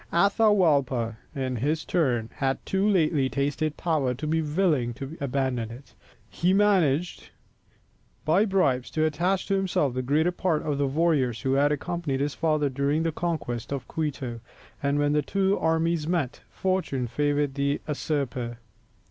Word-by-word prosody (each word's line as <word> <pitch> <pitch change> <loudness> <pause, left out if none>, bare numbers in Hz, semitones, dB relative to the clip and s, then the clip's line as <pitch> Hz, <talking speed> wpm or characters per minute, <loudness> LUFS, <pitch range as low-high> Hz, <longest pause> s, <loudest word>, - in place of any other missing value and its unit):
Atahualpa, 165 - +3 0.2
in 130 -2 -2
his 150 +6 -1
turn, 125 -10 0
had 135 -1 -1
too 195 +1 +1
lately 155 -8 +2
tasted 145 +3 -1
power 145 -7 0
to 145 +5 -6
be 160 +1 +1
willing 150 -7 +1
to 140 +5 -7
abandon 130 -4 -1
it. 120 +4 -12 0.3
He 180 +2 +1
managed 180 -6 +2 1.0
by 175 +7 +4
bribes 145 - +1
to 155 - +3
attach 175 +5 0
to 195 - 0
himself 185 -9 +1
the 130 - -1
greater 150 +7 +2
part 175 -3 0
of 145 -2 -1
the 140 - +2
warriors 140 -5 +1
who 135 -1 0
had 145 +2 +3
accompanied 150 -2 -2
his 145 +1 -1
father 155 -3 +1
during 140 +4 0
the 165 - 0
conquest 155 -9 -3
of 135 -3 -4
Quito, 135 -6 -3 0.4
and 140 0 +1
when 145 0 +2
the 150 - +3
two 195 +5 0
armies 160 -1 +1
met, 165 -7 -1
fortune 185 -9 -1
favoured 145 +3 0
the 140 +1 0
usurper. 130 -5 -2
145 Hz, 155 wpm, -26 LUFS, 135-170 Hz, 1.0 s, by